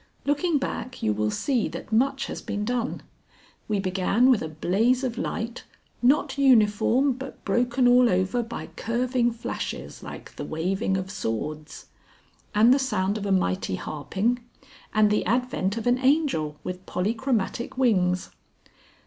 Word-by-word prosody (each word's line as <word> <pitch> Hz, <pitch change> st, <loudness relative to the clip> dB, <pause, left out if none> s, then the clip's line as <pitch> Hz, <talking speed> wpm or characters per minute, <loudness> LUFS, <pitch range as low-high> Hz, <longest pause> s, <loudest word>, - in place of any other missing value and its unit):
Looking 295 Hz, +3 st, +2 dB
back 255 Hz, -1 st, -4 dB
you 105 Hz, -, +2 dB
will 105 Hz, +1 st, 0 dB
see 245 Hz, -, 0 dB
that -, -, -8 dB
much 270 Hz, +5 st, +2 dB
has -, -, -6 dB
been 205 Hz, 0 st, -3 dB
done; 245 Hz, +1 st, -2 dB, 0.6 s
we 210 Hz, -2 st, 0 dB
began 195 Hz, +6 st, +2 dB
with 240 Hz, -, +3 dB
a 160 Hz, -, -3 dB
blaze 220 Hz, -, +1 dB
of 245 Hz, -3 st, -1 dB
light 235 Hz, -2 st, -4 dB, 0.4 s
"not 275 Hz, +2 st, +2 dB
uniform 250 Hz, +1 st, +4 dB
but 265 Hz, +1 st, -8 dB
broken 240 Hz, +4 st, +2 dB
all 245 Hz, 0 st, +6 dB
over 185 Hz, +6 st, +1 dB
by 230 Hz, 0 st, -6 dB
curving 240 Hz, +1 st, 0 dB
flashes 235 Hz, 0 st, -5 dB
like -, -, -10 dB
the -, -, -4 dB
waving 190 Hz, +5 st, -1 dB
of 190 Hz, 0 st, -4 dB
swords," 150 Hz, -, -4 dB, 0.7 s
and 225 Hz, +4 st, +6 dB
the 275 Hz, -, +3 dB
sound 200 Hz, -7 st, 0 dB
of 205 Hz, -, -4 dB
a -, -, 0 dB
mighty 95 Hz, -, +1 dB
harping, 190 Hz, -, -2 dB, 0.5 s
and 215 Hz, -1 st, +4 dB
the 210 Hz, -, +2 dB
advent 235 Hz, -3 st, 0 dB
of 225 Hz, -, -4 dB
an 245 Hz, +1 st, +3 dB
Angel 260 Hz, -, +1 dB
with 180 Hz, 0 st, -5 dB
polychromatic 230 Hz, +4 st, -1 dB
wings. 185 Hz, -8 st, +2 dB
230 Hz, 150 wpm, -25 LUFS, 190-255 Hz, 0.7 s, all